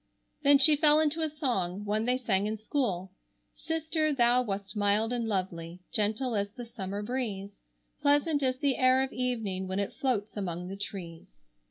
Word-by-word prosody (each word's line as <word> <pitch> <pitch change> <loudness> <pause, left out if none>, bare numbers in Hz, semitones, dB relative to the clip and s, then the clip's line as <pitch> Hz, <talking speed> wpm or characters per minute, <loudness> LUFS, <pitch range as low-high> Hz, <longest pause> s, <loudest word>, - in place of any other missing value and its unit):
Then 285 -1 +6
she 300 +2 +7
fell 300 0 +5
into 315 +1 +1
a 315 - +1
song, 210 - -2
one 215 +2 0
they 250 +1 +2
sang 210 -5 0
in 215 +1 -2
school, 205 - -2 0.4
"Sister, 315 -1 -1
thou 245 -2 +4
wast 200 -3 -4
mild 210 +3 +2
and 235 -2 -1
lovely, 180 -4 -3
Gentle 220 +4 0
as 200 0 0
the 245 - -8
summer 205 -3 -5
breeze, 205 -5 -4 0.4
Pleasant 290 +1 +2
as 255 -1 +1
the 280 -1 0
air 255 +1 +4
of 265 - -4
evening 225 -7 -2
When 190 +1 -3
it 200 -1 -2
floats 225 -6 -1
among 180 -3 -4
the 195 - -5
trees." 170 - -7
225 Hz, 175 wpm, -29 LUFS, 195-265 Hz, 0.4 s, she